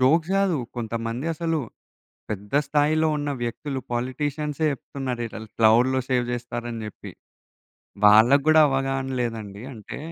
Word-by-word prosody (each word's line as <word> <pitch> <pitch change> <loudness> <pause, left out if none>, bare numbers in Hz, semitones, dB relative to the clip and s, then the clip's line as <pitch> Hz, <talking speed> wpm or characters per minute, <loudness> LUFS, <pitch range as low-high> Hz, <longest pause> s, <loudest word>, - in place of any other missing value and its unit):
Jokes 160 +7 +3
గాదు. 190 -6 +2 0.2
కొంతమంది 115 +4 -3
అసలు 165 0 -1 0.7
పెద్ద 105 0 -6
స్థాయిలో 155 +2 +2
ఉన్న 145 0 -2
వ్యక్తులు 130 +3 -3
పొలిటీషియన్సే 145 +5 -2
చెప్తున్నారు, 130 -2 -5
ఇలా 110 - -8 0.2
క్లౌడ్‌లో 120 +4 +4
సేవ్ 125 -2 +2
జేస్తారని 120 -1 -5
జెప్పి. 105 - -9 0.9
వాళ్ళకి 115 +7 +7
గూడా 155 0 +7
అవగాహన 135 0 -1
లేదండి. 110 -4 -4
అంటే 110 -4 -8
130 Hz, 120 wpm, -24 LUFS, 115-145 Hz, 0.9 s, వాళ్ళకి